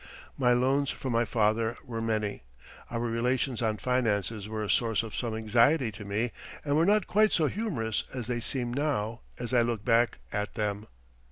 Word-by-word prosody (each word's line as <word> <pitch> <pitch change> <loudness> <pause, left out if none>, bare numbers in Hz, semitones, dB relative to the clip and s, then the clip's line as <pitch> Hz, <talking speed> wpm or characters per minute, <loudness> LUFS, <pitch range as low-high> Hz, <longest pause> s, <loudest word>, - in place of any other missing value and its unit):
My 125 -2 +3
loans 135 +3 +2
from 130 - -3
my 115 +1 +3
father 110 +1 +1
were 115 -3 -4
many. 110 -2 -1 0.5
Our 115 -1 -2
relations 120 +1 0
on 110 -2 +1
finances 110 -4 0
were 110 0 -3
a - - -3
source 115 0 +2
of 110 - -7
some 115 -3 -2
anxiety 115 +4 +3
to 105 +1 -9
me, 105 +4 -1 0.3
and 145 -1 +1
were 165 +3 +4
not 210 -1 +4
quite 215 +2 +3
so 160 - +3
humorous 145 - -1
as 125 -3 -4
they 120 -1 -2
seem 120 0 -2
now 120 -6 -1 0.2
as 120 +1 -4
I 120 - +5
look 115 -3 -1
back 120 -2 +3 0.2
at 105 0 -2
them. 105 -1 -2
115 Hz, 185 wpm, -29 LUFS, 110-130 Hz, 0.5 s, I